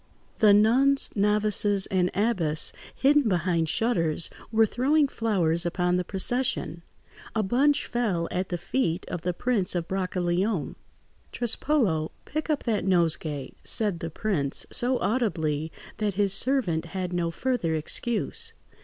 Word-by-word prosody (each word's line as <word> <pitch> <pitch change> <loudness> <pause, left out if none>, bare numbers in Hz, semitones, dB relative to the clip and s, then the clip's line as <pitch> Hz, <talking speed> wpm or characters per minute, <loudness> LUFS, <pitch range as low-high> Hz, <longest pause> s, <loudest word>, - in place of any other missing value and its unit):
The 215 -3 +6
nuns, 250 +7 +3
novices, 205 -1 +3
and 180 -1 0
abbess, 185 -8 +1 0.2
hidden 285 -3 +3
behind 170 -3 0
shutters, 170 -9 +1 0.2
were 225 0 +4
throwing 280 +7 +2
flowers 180 -10 0
upon 180 0 0
the 180 - -1
procession. 205 -2 -1 0.5
A 220 - +1
bunch 280 +8 +2
fell 205 -9 -1
at 185 +1 -2
the 175 - -2
feet 175 -2 -2
of 175 - -4
the 180 +2 -1
Prince 200 0 -1
of 170 -1 -2
Brancaleone. 185 -1 -1 0.6
"Trespolo, 225 - 0 0.2
pick 310 +2 -4
up 300 -2 0
that 220 -4 -1
nosegay," 165 -6 +1
said 205 -6 +1
the 165 - -5
prince, 155 -6 -1
so 250 +1 +1
audibly 160 - -1 0.3
that 210 -3 -2
his 200 -1 +2
servant 195 -8 +1
had 180 +1 -5
no 170 -1 -1
further 175 -4 -1
excuse. 240 - -1
195 Hz, 135 wpm, -26 LUFS, 170-240 Hz, 0.6 s, The